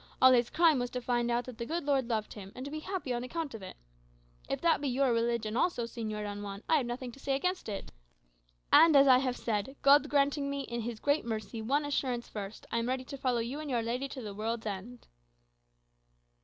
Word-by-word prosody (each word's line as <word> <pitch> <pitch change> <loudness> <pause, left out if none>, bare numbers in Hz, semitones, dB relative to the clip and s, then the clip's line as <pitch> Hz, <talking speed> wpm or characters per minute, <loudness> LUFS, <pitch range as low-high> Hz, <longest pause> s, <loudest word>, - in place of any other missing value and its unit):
All 260 0 +8
his 240 -1 +4
crime 320 -4 +4
was 245 0 -2
to 250 - -3
find 240 -1 0
out 240 +1 0
that 250 -2 -10
the 235 - -3
good 335 +1 -2
Lord 275 -4 +1
loved 220 -2 -2
him, 195 -2 -9
and 255 - -6
to 285 - -6
be 310 - -4
happy 355 -6 -3
on 240 0 -2
account 305 +2 -4
of 225 - -7
it. 185 - -9 0.7
If - - -1
that 335 -3 +3
be 290 - -1
your 260 -1 +2
religion 230 -1 0
also, 265 -2 +1
Señor 220 -3 -4
Don 205 0 -5
Juan, 200 0 -7
I 320 - +4
have 260 -5 -1
nothing 245 +1 -5
to 275 - -15
say 275 0 0
against 360 0 -2
it. 200 - -5 0.8
And, 325 -2 +8
as 275 0 +7
I 255 -1 +7
have 255 -2 -1
said, 225 +4 -2
God 285 +1 +6
granting 280 0 +2
me, 280 0 -2
in 235 -3 -4
his 230 -1 -5
great 285 +4 +1
mercy, 220 -1 -4
one 280 +7 +1
assurance 255 -4 -1
first, 205 0 -7
I 235 - +1
am 230 +1 -2
ready 260 0 -1
to 275 +2 -8
follow 250 -3 +1
you 250 +6 -4
and 305 -1 -5
your 240 -3 0
lady 245 +4 -2
to 270 -2 -8
the 210 -2 -6
world's 225 +2 -3
end." 215 +4 -6
245 Hz, 235 wpm, -31 LUFS, 230-280 Hz, 0.8 s, All